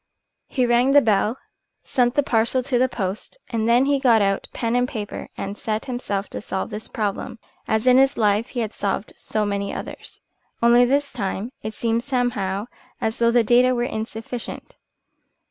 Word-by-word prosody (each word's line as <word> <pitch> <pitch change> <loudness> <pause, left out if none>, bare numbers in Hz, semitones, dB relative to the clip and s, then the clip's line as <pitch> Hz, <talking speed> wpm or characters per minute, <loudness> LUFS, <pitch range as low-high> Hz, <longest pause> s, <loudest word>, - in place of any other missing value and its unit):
He 255 - +1
rang 240 +3 +3
the 285 - +9
bell, 215 +1 +2 0.5
sent 245 -1 +1
the 290 - +3
parcel 240 +1 +1
to 250 -2 +1
the 255 +1 +3
post, 200 - -4
and 225 -1 0
then 245 +3 +5
he 280 0 +2
got 240 -4 +5
out 195 -1 0
pen 230 0 -1
and 245 0 +2
paper 210 -5 -6
and 200 +1 -4
set 215 +1 -3
himself 205 -6 -3
to - - -5
solve 190 -2 -4
this 210 +1 -6
problem, 220 +3 -3 0.3
as 220 +2 0
in 255 0 +6
his 270 +1 +3
life 210 +1 +2
he 245 - -3
had 220 -1 -3
solved 200 +1 -2
so 215 -1 -2
many 200 -1 -2
others. - - -8 0.4
Only 240 +1 +6
this 280 +3 0
time 205 +1 -3
it 215 0 -6
seemed 230 0 0
somehow 225 -7 -1 0.3
as 220 0 -2
though 235 0 +4
the 235 0 +4
data 250 +3 +4
were 240 - 0
insufficient. 225 +1 -5
230 Hz, 180 wpm, -23 LUFS, 210-250 Hz, 0.5 s, the